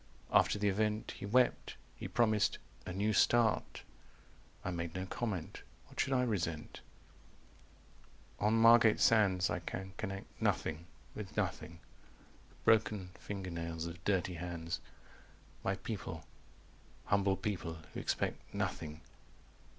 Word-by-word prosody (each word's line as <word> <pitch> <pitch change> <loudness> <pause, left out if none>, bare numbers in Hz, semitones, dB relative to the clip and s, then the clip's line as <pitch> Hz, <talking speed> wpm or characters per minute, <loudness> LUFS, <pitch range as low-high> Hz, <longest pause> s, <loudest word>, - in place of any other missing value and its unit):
After - - +5
the 105 0 +1
event 105 +2 0
He 100 - -7
wept. 125 +4 +2 0.2
He - - -6
promised 110 -3 +2 0.3
'a - - -3
new 105 +3 +1
start.' 115 +2 +3 0.8
I 90 - 0
made 85 -1 -4
no 95 0 -2
comment. 95 -4 -3 0.2
What - - -13
should 135 - +2
I 125 -1 +3
resent?" 85 -10 -2 1.6
"On 105 +2 +3
Margate 115 -1 +7
Sands. 95 -5 +4
300 85 -1 0
I - - -21
can 95 0 -5
connect 95 -2 -6
Nothing 80 +2 0 0.3
with 105 -3 -7
nothing. 85 0 -2 0.7
The - - -24
broken 105 -4 +3
finger 95 -3 -5
nails 85 -1 -3
of 85 +1 -7
dirty 95 -2 +1
hands. 85 -1 -4 0.8
My - - +1
people - - -5 0.8
humble 100 -1 +2
people 90 -5 -3 0.2
who - - -4
expect - - -1
Nothing." 80 0 -3
95 Hz, 125 wpm, -34 LUFS, 85-110 Hz, 1.6 s, Margate